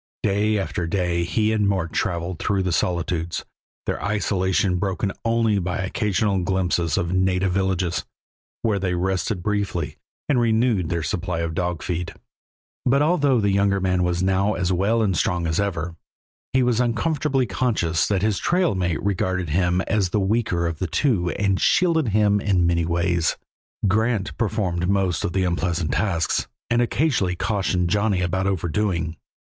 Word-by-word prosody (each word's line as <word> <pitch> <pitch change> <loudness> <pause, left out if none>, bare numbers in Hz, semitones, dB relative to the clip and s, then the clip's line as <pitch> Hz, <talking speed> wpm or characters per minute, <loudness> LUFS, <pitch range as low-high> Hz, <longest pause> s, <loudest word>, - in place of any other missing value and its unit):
Day 105 +1 +2
after 95 -3 -2
day 85 -1 0
he 105 +6 +1
and 105 -2 +2
Mort 95 -5 -1
traveled 85 0 -2
through 100 -2 0
the 90 - -1
solitudes, 85 -1 -1 0.4
their - - -3
isolation 95 -2 +1
broken 95 +1 -1
only 115 -3 +2
by 90 0 -2
occasional 100 0 0
glimpses 90 -2 0
of 85 +1 -1
native 95 0 +1
villages, 95 -2 0 0.6
where 105 -3 +1
they 90 -2 -1
rested 95 +1 -1
briefly 100 -6 -2 0.3
and 140 -4 +2
renewed 110 -6 +2
their 85 -2 -1
supply 85 0 -2
of 85 -1 -2
dog 90 0 -2
feed. 90 -1 -3 0.7
But 140 +3 +3
although 145 -6 +3
the 100 -2 +2
younger 100 0 +2
man 90 -1 +1
was 90 0 0
now 95 +2 +2
as 90 +1 0
well 105 +6 +2
and 95 -4 +1
strong 90 +1 0
as 80 +2 0
ever, 85 -4 -2 0.6
he 130 0 +3
was 120 -2 +2
uncomfortably 135 +3 +1
conscious 95 -7 0
that 100 -2 0
his 105 -3 +1
trail 180 - +2
mate 90 -4 -1
regarded 95 -3 -1
him 90 +2 +1
as 100 -2 0
the 105 - 0
weaker 95 -4 0
of 85 -2 -3
the 95 - -1
two 90 - +1
and 100 0 0
shielded 165 -5 +3
him 105 -1 +3
in 95 -4 +2
many 85 -1 +2
ways. 85 0 0 0.5
Grant 110 0 0
performed 95 -5 -1
most 95 -4 +1
of 90 - -2
the 95 - +1
unpleasant 85 -2 -1
tasks, 85 -6 0 0.2
and 120 0 +3
occasionally 120 - +1
cautioned 90 -3 0
Johnny 105 -2 +1
about 95 +2 0
overdoing. 85 -2 -1
95 Hz, 160 wpm, -23 LUFS, 90-105 Hz, 0.7 s, But